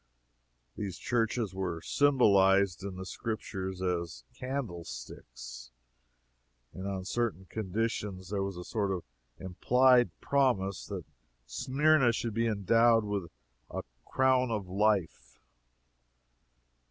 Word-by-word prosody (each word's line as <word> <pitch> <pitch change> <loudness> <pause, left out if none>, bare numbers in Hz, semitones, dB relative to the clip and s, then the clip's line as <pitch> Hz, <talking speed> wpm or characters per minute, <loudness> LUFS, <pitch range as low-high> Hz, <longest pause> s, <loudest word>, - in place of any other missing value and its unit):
These 100 -4 -4
churches 115 -4 0
were 90 -3 -3
symbolized 100 - +4
in 100 -2 -5
the 95 0 -6
Scriptures 95 -3 -4
as 85 -8 -2
candlesticks, 85 - -7 1.0
and 95 +1 -6
on 95 -2 -3
certain 110 -3 -1
conditions 100 -1 -3
there 100 -2 0
was 95 -2 -3
a 90 - -6
sort 100 0 -1
of 90 -3 -2 0.3
implied 125 +7 +4
promise 120 - +1
that - - -5 0.4
Smyrna 135 - +3
should 115 0 -2
be 115 +2 +1
endowed 115 +2 +4
with 100 -5 -3 0.4
a - - -4 0.2
"crown 130 -1 +2
of 105 -4 -2
life." 95 - 0
100 Hz, 105 wpm, -30 LUFS, 95-115 Hz, 1.0 s, symbolized